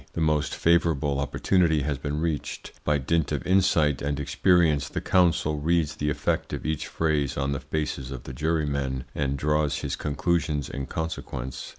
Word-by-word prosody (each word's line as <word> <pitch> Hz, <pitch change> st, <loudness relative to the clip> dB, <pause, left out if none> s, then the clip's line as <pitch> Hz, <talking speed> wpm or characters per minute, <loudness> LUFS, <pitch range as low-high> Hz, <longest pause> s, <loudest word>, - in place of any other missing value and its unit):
The -, -, -3 dB
most 75 Hz, -2 st, +1 dB
favourable 80 Hz, -5 st, +2 dB
opportunity 80 Hz, +2 st, +2 dB
has 70 Hz, -1 st, -2 dB
been 75 Hz, +1 st, -3 dB
reached. 80 Hz, -3 st, -3 dB
By 75 Hz, -1 st, +2 dB
dint 80 Hz, +4 st, 0 dB
of -, -, -2 dB
insight 85 Hz, -6 st, +3 dB
and 70 Hz, 0 st, -1 dB
experience 75 Hz, -1 st, +2 dB
the -, -, -3 dB
counsel 85 Hz, -4 st, +2 dB
reads 80 Hz, 0 st, +1 dB
the 75 Hz, -, 0 dB
effect 75 Hz, -, -1 dB
of -, -, -4 dB
each 80 Hz, -1 st, -2 dB
phrase 75 Hz, -4 st, 0 dB
on 70 Hz, 0 st, 0 dB
the 70 Hz, -, -1 dB
faces 75 Hz, -4 st, -3 dB
of 65 Hz, -3 st, -7 dB
the 65 Hz, -, -8 dB
jurymen, 70 Hz, -3 st, -1 dB
and 70 Hz, -1 st, -1 dB
draws 75 Hz, 0 st, +1 dB
his -, -, -2 dB
conclusions 75 Hz, -1 st, -1 dB
in 70 Hz, -1 st, -4 dB
consequence. 65 Hz, -5 st, -5 dB
75 Hz, 170 wpm, -26 LUFS, 70-80 Hz, -, insight